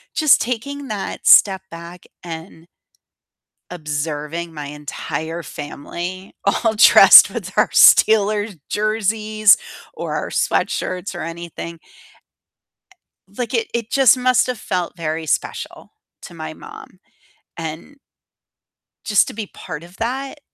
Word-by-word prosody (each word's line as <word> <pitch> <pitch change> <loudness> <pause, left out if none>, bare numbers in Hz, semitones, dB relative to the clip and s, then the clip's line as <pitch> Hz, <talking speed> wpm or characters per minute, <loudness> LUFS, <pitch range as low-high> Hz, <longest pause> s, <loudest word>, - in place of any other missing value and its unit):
just 310 -3 +4
taking 275 +4 -4
that 210 -4 -5
step 190 -2 +6
back 170 +1 -11 0.2
and 165 0 -10 1.1
observing 150 +1 -5
my 150 -2 -7
entire 150 +3 -6
family 175 +7 -8
all 220 +3 +1
dressed 215 - +8
with - - -7
our - - +3
Steelers 210 -2 +4
jerseys 215 0 +2 0.4
or - - -5
our - - -4
sweatshirts 185 +2 -2
or 175 - -6
anything 170 0 -8 1.5
like, 230 +5 -6
it 230 -1 0
it 235 -1 -3
just 265 -4 +5
must 255 0 +2
have 250 -2 -4
felt 180 -3 -4
very 160 -1 -4
special 145 - -4 0.3
to - - -11
my - - -7
mom, - - -13 0.6
and 165 - -8 1.1
just 210 -2 +2
to - - -8
be 215 -1 -5
part 160 -5 -9
of 175 +2 -15
that 265 +6 -4
185 Hz, 115 wpm, -19 LUFS, 165-220 Hz, 1.5 s, dressed